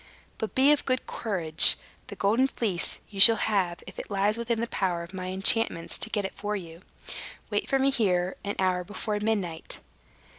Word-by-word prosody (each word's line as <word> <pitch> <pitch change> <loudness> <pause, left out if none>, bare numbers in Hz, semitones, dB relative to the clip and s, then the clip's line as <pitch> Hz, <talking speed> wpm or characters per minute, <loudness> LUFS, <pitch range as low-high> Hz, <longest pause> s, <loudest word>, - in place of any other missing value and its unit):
But 220 - -6
be 270 +3 +4
of 295 - +1
good 255 -1 -2
courage. 175 -8 +5 0.3
The - - -10
Golden 225 +7 +1
Fleece 205 -9 -3
you 200 - -10
shall 225 +3 +10
have, 190 -6 -2
if - - -12
it - - -9
lies 200 +1 0
within 235 0 -3
the 230 - -2
power 180 -6 -3
of 170 +3 -13
my 185 -1 -6
enchantments 190 -1 +1
to - - -2
get 205 -3 -3
it - - -6
for 210 +1 -5
you. 170 -4 -9 0.7
Wait - - -3
for 270 - +1
me 270 +1 +1
here 185 -7 -1
an 200 - -5
hour 185 -1 -1
before 210 +2 -5
midnight." 200 -7 -4
205 Hz, 190 wpm, -25 LUFS, 180-225 Hz, 0.7 s, shall